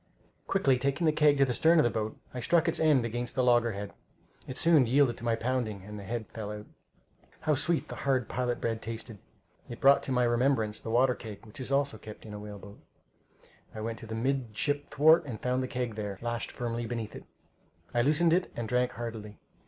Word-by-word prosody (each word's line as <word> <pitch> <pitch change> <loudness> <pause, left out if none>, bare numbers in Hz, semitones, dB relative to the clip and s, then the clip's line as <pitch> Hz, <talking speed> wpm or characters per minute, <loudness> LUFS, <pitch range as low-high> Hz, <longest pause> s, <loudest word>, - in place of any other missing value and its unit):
Quickly 135 -10 +2
taking 140 +5 0
the 155 - +5
keg 150 -1 +4
to 140 - +5
the 125 - -1
stern 165 +6 +4
of 155 - +6
the 120 - +2
boat, 110 0 -3 0.2
I 125 - -4
struck 170 +7 +2
its 165 - +1
end 150 -6 +4
against 120 +1 -3
the 130 - +2
loggerhead. 115 -5 +2 0.5
It 130 - -6
soon 160 -7 +5
yielded 130 -1 +3
to - - -11
my 115 -1 +1
pounding, 115 -4 -2
and 105 +1 -8
the - - -8
head 115 +3 -4
fell 105 -2 -5
out. 105 0 -7 0.8
How 155 -1 +2
sweet 155 +4 +1
the - - -7
hard 130 -4 0
pilot 125 -1 -2
bread 115 -1 -2
tasted! 115 -1 -7 0.5
It 120 - -7
brought 140 +1 +6
to - - -5
my 125 -1 +2
remembrance 120 -3 +1
the - - -7
water 125 +3 +4
keg 110 -3 -10
which 110 - -10
is 130 +1 -4
also 140 +1 +1
kept 105 0 -11
in 105 - -9
a 105 - -6
whale 105 0 -8
boat. 100 +1 -13 1.0
I 110 - -5
went 115 +1 -4
to 115 - -10
the 110 - -5
midship 135 +3 -1
thwart, 160 +4 +5
and 115 -5 -5
found 125 +1 0
the 130 - -2
keg 125 -3 -3
there, 105 -2 -5
lashed 120 0 -2
firmly 120 -1 -3
beneath 115 -3 -4
it. - - -10 0.7
I 120 - +3
loosened 155 +5 +3
it 180 +1 +1
and 120 -1 -3
drank 125 +1 +1
heartily. 110 -3 -7
120 Hz, 220 wpm, -29 LUFS, 110-135 Hz, 1.0 s, of